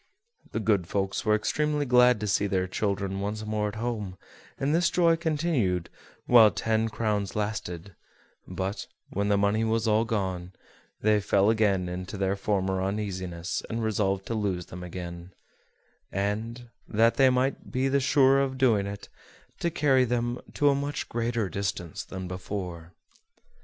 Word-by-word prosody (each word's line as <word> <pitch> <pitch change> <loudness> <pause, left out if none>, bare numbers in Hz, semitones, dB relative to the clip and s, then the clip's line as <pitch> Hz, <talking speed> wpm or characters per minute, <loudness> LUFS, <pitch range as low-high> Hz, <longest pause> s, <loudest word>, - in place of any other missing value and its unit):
The - - -2
good 105 -6 +1
folks 95 0 -2
were 105 0 +4
extremely 150 +6 0
glad 125 -2 +5
to 105 - -2
see 100 +1 +2
their 95 -1 0
children 95 0 -2
once 105 +2 -3
more 105 0 -1
at 105 - -5
home, 110 -5 -3 0.4
and 140 +2 0
this 170 +1 +3
joy 170 -2 +4
continued 150 - 0 0.3
while 115 -3 +8
the - - -13
ten 110 0 +1
crowns 105 -3 -1
lasted; 100 -4 -3 0.5
but, 95 +2 -4 0.2
when 100 +1 -1
the 100 0 +3
money 100 +2 +2
was 115 0 +1
all 110 +1 +3
gone, 95 -5 -2 0.5
they 105 0 +4
fell 100 +1 +3
again 100 -5 +2
into 90 +3 -5
their 95 0 0
former 95 -2 0
uneasiness, 95 -3 -3
and 115 0 -2
resolved 100 -3 0
to - - -3
lose 100 -5 -1
them 90 - -9
again; 90 0 -7 0.8
and, 110 +5 -3 0.2
that 115 +2 +3
they 135 -1 +6
might 130 +1 0
be 130 +1 +1
the 140 +1 +2
surer 135 0 +4
of 135 -1 -2
doing 115 -7 +3
it, 100 0 -7 0.5
to 170 - 0
carry 135 -5 +3
them 120 0 -1 0.2
to 145 - +4
a - - +4
much 140 +1 -3
greater 115 -2 -1
distance 90 -2 -3
than 95 -1 -7
before. 90 -2 -6
105 Hz, 160 wpm, -27 LUFS, 95-120 Hz, 0.8 s, while